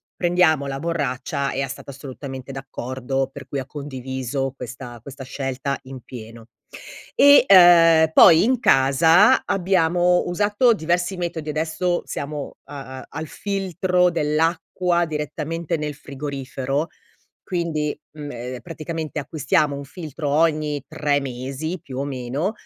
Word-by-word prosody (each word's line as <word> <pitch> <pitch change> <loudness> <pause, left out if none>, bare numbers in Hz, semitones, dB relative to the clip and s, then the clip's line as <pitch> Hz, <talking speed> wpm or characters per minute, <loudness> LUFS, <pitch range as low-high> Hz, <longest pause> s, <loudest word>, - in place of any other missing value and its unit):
prendiamo 170 -5 +2
la 135 0 -4
borraccia" 140 -3 -2
ea 135 +1 -2
stata 135 +1 -8
assolutamente 135 -1 -8
d'accordo 135 0 -3
per 140 +1 -10
cui 140 - -4
ha 130 - -5
condiviso 130 -1 -4
questa 120 -1 -8
questa 135 +2 -9
scelta 135 +1 -3
in 130 0 -9
pieno. 115 -2 -11 0.7
E, 285 -1 +8
uhm, 165 -4 +7
poi 165 +1 +8
in 250 +1 +2
casa 160 - +5
abbiamo 180 -1 +2
usato 205 +6 +3
diversi 175 0 -1
metodi 165 -3 -4
adesso 160 +3 -1
siamo, 145 0 -5
uhm, 145 - -10
a 130 -1 -8
al 160 +2 -5
filtro 185 -1 0
dell'acqua 170 +3 0
direttamente 160 +2 -3
nel 150 -1 -3
frigorifero. 140 +1 -4 0.6
Quindi, 160 -4 -2
mhmm, 150 -1 -8
ehm, 125 +1 -6
praticamente 155 +4 -5
acquistiamo 145 0 0
un 140 - -6
filtro 155 0 -6
ogni 150 -1 +1
3 145 -2 0
mesi, 135 +6 -5
più 130 -5 -8
o 140 - -1
meno, 140 - -3
150 Hz, 125 wpm, -22 LUFS, 135-170 Hz, 0.7 s, E